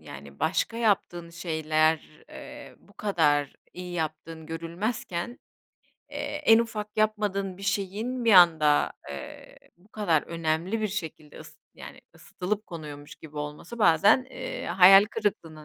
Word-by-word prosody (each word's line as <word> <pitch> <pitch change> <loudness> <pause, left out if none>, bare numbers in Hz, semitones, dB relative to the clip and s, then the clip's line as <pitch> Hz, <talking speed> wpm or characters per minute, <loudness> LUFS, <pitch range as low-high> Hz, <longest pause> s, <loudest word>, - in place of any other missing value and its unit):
yani 70 +1 -12
başka 210 +7 0
yaptığın 190 -6 0
şeyler, 155 -2 -1
eee, - - -11
bu - - -23
kadar 150 -8 +1 0.2
iyi 180 0 -8
yaptığın 160 0 -5
görülmezken, 170 +5 -4 0.7
eee, - - -8 0.3
en 225 0 +7
ufak 215 -2 -4
yapmadığın 205 -3 0
bir 195 - -13
şeyin 205 +6 -2
bir 225 - +4
anda, 160 -5 +5 0.2
eee, 70 -2 -10 0.2
bu 180 +4 -26
kadar 190 -9 0
önemli 165 +5 -2
bir 215 - -1
şekilde 160 -6 -7
ıs - - -14 0.2
yani - - -11
ısıtılıp 210 +4 -5
konuyormuş 150 -4 -9
gibi 150 -1 -14
olması 150 +9 -7
bazen, 205 +5 +4
eee, - - -6
hayal 195 +2 +7
kırıklığına 185 -8 -4
175 Hz, 130 wpm, -26 LUFS, 155-210 Hz, 0.7 s, en